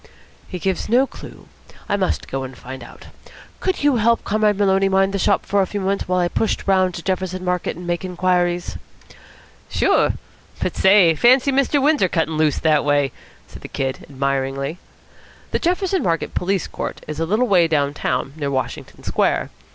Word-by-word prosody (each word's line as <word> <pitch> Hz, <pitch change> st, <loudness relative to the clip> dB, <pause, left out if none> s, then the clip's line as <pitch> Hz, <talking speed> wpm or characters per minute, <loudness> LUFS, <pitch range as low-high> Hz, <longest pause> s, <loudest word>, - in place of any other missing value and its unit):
"He 185 Hz, -, -5 dB
gives 190 Hz, +2 st, -2 dB
no 250 Hz, +4 st, +4 dB
clue. -, -, -12 dB, 0.4 s
I -, -, +1 dB
must 190 Hz, -2 st, -1 dB
go 135 Hz, -, -3 dB
and 130 Hz, -1 st, -8 dB
find 130 Hz, -1 st, -9 dB
out. -, -, -13 dB, 0.5 s
Could 375 Hz, -5 st, -1 dB
you 285 Hz, -4 st, +4 dB
help 230 Hz, +1 st, +2 dB
Comrade 210 Hz, -1 st, +1 dB
Maloney 195 Hz, -1 st, +3 dB
mind 195 Hz, 0 st, +2 dB
the 200 Hz, -, -1 dB
shop -, -, +1 dB
for 200 Hz, 0 st, +2 dB
a 190 Hz, -, 0 dB
few 205 Hz, -, -4 dB
moments 195 Hz, +1 st, -1 dB
while 180 Hz, 0 st, +1 dB
I 175 Hz, -, +2 dB
push 215 Hz, +5 st, 0 dB
round 185 Hz, -2 st, +2 dB
to 170 Hz, -, -7 dB
Jefferson 185 Hz, -1 st, -2 dB
Market 180 Hz, -2 st, -1 dB
and 175 Hz, -, -8 dB
make 175 Hz, +1 st, -2 dB
inquiries?" 180 Hz, -1 st, 0 dB, 0.9 s
"Sure. -, -, +2 dB, 0.5 s
But -, -, -2 dB
say, 190 Hz, -4 st, +5 dB
fancy 255 Hz, -, +4 dB
Mr. 275 Hz, +2 st, +2 dB
Windsor 285 Hz, -, +3 dB
cuttin' 160 Hz, -2 st, 0 dB
loose 155 Hz, -1 st, +2 dB
that 155 Hz, -2 st, +2 dB
way!" 145 Hz, -2 st, +2 dB, 0.4 s
said -, -, -12 dB
the -, -, -8 dB
Kid 135 Hz, -1 st, -4 dB
admiringly. 140 Hz, +3 st, -2 dB, 0.7 s
The -, -, 0 dB
Jefferson 365 Hz, +2 st, 0 dB
Market 165 Hz, -2 st, -1 dB
Police 190 Hz, +1 st, 0 dB
Court -, -, -6 dB
is 155 Hz, 0 st, -5 dB
a 165 Hz, -, -1 dB
little 215 Hz, +7 st, +2 dB
way 180 Hz, -5 st, +4 dB
down 145 Hz, -3 st, +1 dB
town, 130 Hz, -1 st, -2 dB
near 145 Hz, -3 st, -3 dB
Washington 130 Hz, -1 st, -4 dB
Square. -, -, 0 dB
180 Hz, 180 wpm, -20 LUFS, 155-205 Hz, 0.9 s, say